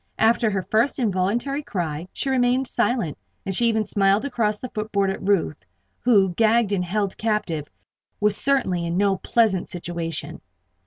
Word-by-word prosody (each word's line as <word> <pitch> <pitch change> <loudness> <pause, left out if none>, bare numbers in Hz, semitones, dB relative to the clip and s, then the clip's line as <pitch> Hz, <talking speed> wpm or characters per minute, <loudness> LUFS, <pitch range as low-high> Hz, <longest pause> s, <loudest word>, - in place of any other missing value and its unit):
After 225 0 +3
her 195 -2 -2
first 220 +9 +1
involuntary 235 +5 0
cry, 175 - -4
she 270 - -2
remained 255 0 +2
silent, 225 - -1 0.3
and 190 - -3
she 235 +4 +3
even 220 -1 +1
smiled 200 +2 +2
across 220 -6 0
the 250 +3 -8
footboard 205 -2 0
at 195 - -6
Ruth, 185 - 0 0.4
who, 205 -6 +4
gagged 225 +1 +3
and 190 -3 0
held 200 +2 -2
captive, 200 -9 -1 0.5
was 210 -1 +2
certainly 245 -12 +1
in 170 +1 -2
no 200 -1 +2
pleasant 205 -2 +1
situation. 170 -2 -5
205 Hz, 155 wpm, -23 LUFS, 185-235 Hz, 0.5 s, who